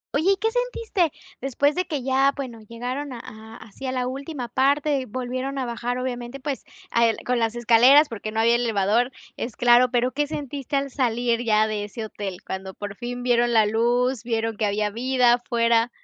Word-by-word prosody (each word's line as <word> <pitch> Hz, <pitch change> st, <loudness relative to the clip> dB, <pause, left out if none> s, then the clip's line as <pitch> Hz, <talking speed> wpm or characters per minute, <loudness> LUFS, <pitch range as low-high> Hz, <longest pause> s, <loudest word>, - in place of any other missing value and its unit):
Oye, 360 Hz, +7 st, +4 dB
¿y -, -, -3 dB
qué 445 Hz, +3 st, +1 dB
sentiste?, 460 Hz, -, 0 dB, 0.3 s
después 275 Hz, +2 st, +1 dB
de 365 Hz, +2 st, -1 dB
que 295 Hz, -7 st, -3 dB
ya, 270 Hz, +1 st, +3 dB
bueno, 245 Hz, -5 st, -6 dB
llegaron 250 Hz, +5 st, -5 dB
a 235 Hz, -, -7 dB
a 220 Hz, +1 st, -11 dB
así 220 Hz, +5 st, -9 dB
a -, -, -1 dB
la 250 Hz, -1 st, -1 dB
última 270 Hz, 0 st, -5 dB
parte, 275 Hz, +2 st, +1 dB
volvieron 255 Hz, +3 st, -4 dB
a 260 Hz, -, -1 dB
bajar, 240 Hz, +1 st, -3 dB
obviamente, 250 Hz, +1 st, -4 dB
pues, 280 Hz, 0 st, -4 dB, 0.3 s
a 235 Hz, 0 st, +4 dB
el 225 Hz, -, 0 dB
con 250 Hz, -1 st, +1 dB
las 225 Hz, 0 st, 0 dB
escaleras 245 Hz, +6 st, +6 dB
porque 215 Hz, -1 st, -5 dB
no 220 Hz, -, -2 dB
había 230 Hz, +1 st, +4 dB
elevador, 230 Hz, +1 st, +1 dB, 0.3 s
es 235 Hz, -, -5 dB
claro, 245 Hz, +1 st, +5 dB
pero 250 Hz, 0 st, +1 dB
¿qué 295 Hz, +1 st, -1 dB
sentiste 285 Hz, -2 st, -5 dB
al 275 Hz, -1 st, 0 dB
salir 240 Hz, -2 st, 0 dB
ya 215 Hz, -1 st, +3 dB
de 210 Hz, -1 st, -2 dB
ese 220 Hz, +2 st, -6 dB
hotel?, 195 Hz, -4 st, -6 dB
cuando 190 Hz, 0 st, -6 dB
por 205 Hz, -1 st, -6 dB
fin 245 Hz, +1 st, -5 dB
vieron 240 Hz, -1 st, +2 dB
la 220 Hz, -2 st, +5 dB
luz, 240 Hz, +3 st, +1 dB
vieron 225 Hz, -1 st, -1 dB
que 210 Hz, -1 st, 0 dB
había 210 Hz, +1 st, 0 dB
vida 250 Hz, +1 st, +3 dB
afuera. 235 Hz, -1 st, +2 dB
245 Hz, 200 wpm, -24 LUFS, 225-270 Hz, 0.3 s, escaleras